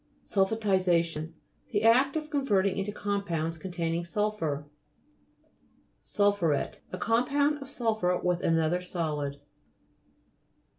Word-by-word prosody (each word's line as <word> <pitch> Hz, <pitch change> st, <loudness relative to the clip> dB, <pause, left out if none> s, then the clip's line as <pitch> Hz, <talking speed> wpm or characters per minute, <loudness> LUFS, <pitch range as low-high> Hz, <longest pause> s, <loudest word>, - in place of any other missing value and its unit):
SULPHATISA'TION 185 Hz, -6 st, +1 dB, 0.3 s
The 205 Hz, -, 0 dB
act 255 Hz, +5 st, +5 dB
of 310 Hz, -1 st, -3 dB
con 285 Hz, -2 st, 0 dB
verting 200 Hz, -6 st, +2 dB
into 195 Hz, +1 st, -2 dB
compounds 175 Hz, -6 st, -2 dB
containing 170 Hz, -1 st, -2 dB
sulphur. 170 Hz, -6 st, -2 dB, 1.4 s
SUL'PHURET 200 Hz, -8 st, +1 dB
A 185 Hz, -, -4 dB
compound 280 Hz, +7 st, +1 dB
of 275 Hz, -, -8 dB
sul 230 Hz, -5 st, 0 dB
phur 180 Hz, -4 st, 0 dB
with 180 Hz, -1 st, +1 dB
an 165 Hz, -, +2 dB
other 165 Hz, +3 st, +1 dB
solid. 150 Hz, -6 st, -3 dB
190 Hz, 110 wpm, -29 LUFS, 165-220 Hz, 1.4 s, act